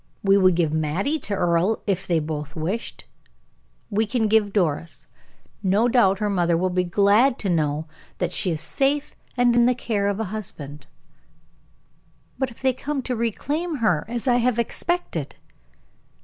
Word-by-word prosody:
We 195 0 +4
would 185 -3 +4
give 165 -3 +1
Mattie 165 - 0
to 205 - -2
Earle, 175 +3 +1
if 195 -3 -1
they 170 - +2
both 150 -1 -4
wished 180 +9 -4
it. - - -33 0.8
We 215 +2 +1
can 225 0 +1
give 210 -1 +3
Doris. 165 -5 -1 0.6
No 205 +4 +2
doubt 230 -6 +3
her 210 +1 -1
mother 175 -4 +1
will 185 +2 0
be 180 0 +1
glad 205 +8 +3
to 195 - -1
know 155 -2 0 0.3
that 180 -1 -2
she 185 - +1
is 160 -2 -2
safe 280 - 0 0.2
in 240 -1 +4
the 250 - +2
care 210 -4 -1
of 200 +1 -1
a - - 0
husband." 150 -9 -7 1.5
"But 265 -2 0
if 235 - -15
they 260 -1 +3
come 275 +1 -4
to 250 - -2
reclaim 290 - -2
her, 180 - +1
as 240 +2 -3
I 245 -1 +4
have 245 -1 +1
expected?" 235 - -2
200 Hz, 165 wpm, -23 LUFS, 170-240 Hz, 1.5 s, We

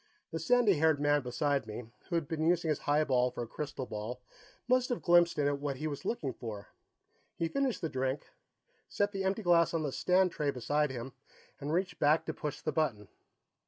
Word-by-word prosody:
The - - -3
sandy 240 - +3
haired 160 -2 +4
man 145 0 +3
beside 140 0 -1
me, 110 +3 -6 0.3
who 175 - -1
had 165 -4 0
been 155 0 -2
using 170 0 +2
his 150 - +1
highball 140 -4 +2
for 120 -1 -5
a - - -7
crystal 145 +1 -5
ball, 110 +3 -5 0.5
must 255 0 +3
have 245 - -2
glimpsed 175 -1 +5
in 145 - +2
it 145 0 0
what 140 -1 -2
he 155 - -5
was 145 -3 -4
looking 145 - -2
for. 105 -4 -7 0.7
He 165 - -1
finished 270 +5 -1
the 165 - 0
drink, 130 -1 -3 0.6
set 205 0 0
the 195 -2 -3
empty 195 +3 0
glass 170 -2 +4
on 160 - 0
the 145 - -1
stand 185 +5 +3
tray 150 -3 -1
beside 145 +3 0
him, 125 0 -6 0.5
and 145 +1 -4
reached 180 0 -1
back 150 +2 +3
to 160 - -3
push 150 -1 -5
the 155 - -1
button. 125 - -1
150 Hz, 205 wpm, -32 LUFS, 135-175 Hz, 0.7 s, glimpsed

